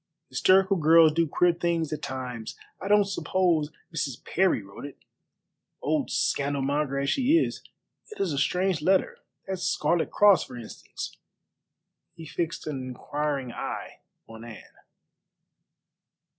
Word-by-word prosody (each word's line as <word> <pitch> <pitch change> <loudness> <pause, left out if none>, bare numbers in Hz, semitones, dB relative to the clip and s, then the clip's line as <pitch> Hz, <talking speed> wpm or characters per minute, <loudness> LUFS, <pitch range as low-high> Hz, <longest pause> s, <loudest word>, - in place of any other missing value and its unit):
Hysterical 190 +8 +4
girls 160 0 +6
do 165 +1 +2
queer 175 +4 +3
things 170 -3 -1
at 150 - -5
times. 125 -4 -6 0.2
I - - -4
don't 205 0 +5
suppose 180 -5 0 0.2
Mrs. 145 -6 -3
Parry 185 - +1
wrote 100 0 -12
it, 140 -1 -8 0.8
old 150 -1 -1
scandal 140 -1 0
monger 140 0 0
as 140 0 0
she 275 +4 +3
is. 330 - -1 0.5
It 430 - -11
is 180 -6 0
a 140 - -1
strange 180 +3 +1
letter. 190 +4 +2 0.3
That 190 0 -3
Scarlet 170 -1 0
Cross, 205 -2 +5
for 125 - -10
instance." 115 -2 -8 1.0
He 165 -1 -10
fixed 165 +2 -3
an 145 -4 -4
inquiring 135 +1 -3
eye - - -6 0.3
on 110 0 -11
Anne. 115 -4 -11
155 Hz, 135 wpm, -27 LUFS, 140-180 Hz, 1.0 s, girls